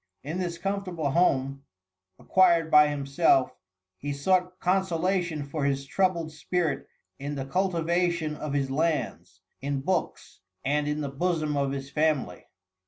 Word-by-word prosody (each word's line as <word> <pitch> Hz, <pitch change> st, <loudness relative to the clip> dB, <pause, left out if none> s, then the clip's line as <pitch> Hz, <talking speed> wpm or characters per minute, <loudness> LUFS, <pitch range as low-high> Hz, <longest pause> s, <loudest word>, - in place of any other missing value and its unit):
In 155 Hz, +6 st, -4 dB
this 175 Hz, -2 st, -3 dB
comfortable 185 Hz, -5 st, -2 dB
home, 135 Hz, -4 st, +1 dB, 0.5 s
acquired 170 Hz, -4 st, +3 dB
by 150 Hz, 0 st, +8 dB
himself, 140 Hz, -1 st, +2 dB, 0.5 s
he 145 Hz, -, -4 dB
sought 180 Hz, +5 st, +1 dB
consolation 180 Hz, -3 st, 0 dB
for 145 Hz, +1 st, -4 dB
his 140 Hz, -1 st, 0 dB
troubled 170 Hz, +1 st, 0 dB
spirit 155 Hz, -2 st, -2 dB, 0.3 s
in 145 Hz, +1 st, -4 dB
the 135 Hz, -1 st, -4 dB
cultivation 170 Hz, -1 st, 0 dB
of 150 Hz, -1 st, -5 dB
his 135 Hz, -2 st, 0 dB
lands, 160 Hz, +3 st, -2 dB, 0.2 s
in 140 Hz, 0 st, -2 dB
books 180 Hz, -, -2 dB, 0.3 s
and 145 Hz, +2 st, +1 dB
in 150 Hz, +1 st, -1 dB
the 145 Hz, -, -3 dB
bosom 155 Hz, 0 st, -1 dB
of 140 Hz, -1 st, 0 dB
his 135 Hz, 0 st, -5 dB
family. 150 Hz, -, 0 dB
155 Hz, 135 wpm, -27 LUFS, 140-175 Hz, 0.5 s, by